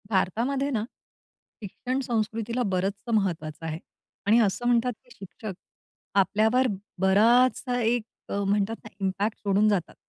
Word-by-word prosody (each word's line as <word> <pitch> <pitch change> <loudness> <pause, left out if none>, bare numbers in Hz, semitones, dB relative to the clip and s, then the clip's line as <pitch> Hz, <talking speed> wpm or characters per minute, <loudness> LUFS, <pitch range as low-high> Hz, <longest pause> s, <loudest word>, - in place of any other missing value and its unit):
भारतातमध्ये 235 +8 0
ना, 220 -5 0 0.8
शिक्षण 250 +6 -3
संस्कृतीला 230 +1 -1
बरचसं 195 +4 -2
महत्वाचं 165 -6 -1
आहे. 160 0 -3 0.5
आणि 225 +3 +6
असं 225 +2 +1
म्हणतात, 245 +1 +3
की 245 - -26
शिक्षक, 195 +2 -7 0.7
आपल्यावर 220 +6 +3 0.3
बराचसा 245 +6 +4
एक 230 0 +1 0.3
अ, - - -4
म्हणतात 205 +2 +1
ना 215 - -10 0.2
इम्पॅक्ट 200 +3 -1
सोडून 200 +1 +2
जातात. 190 -5 -1
215 Hz, 125 wpm, -26 LUFS, 195-240 Hz, 0.8 s, आणि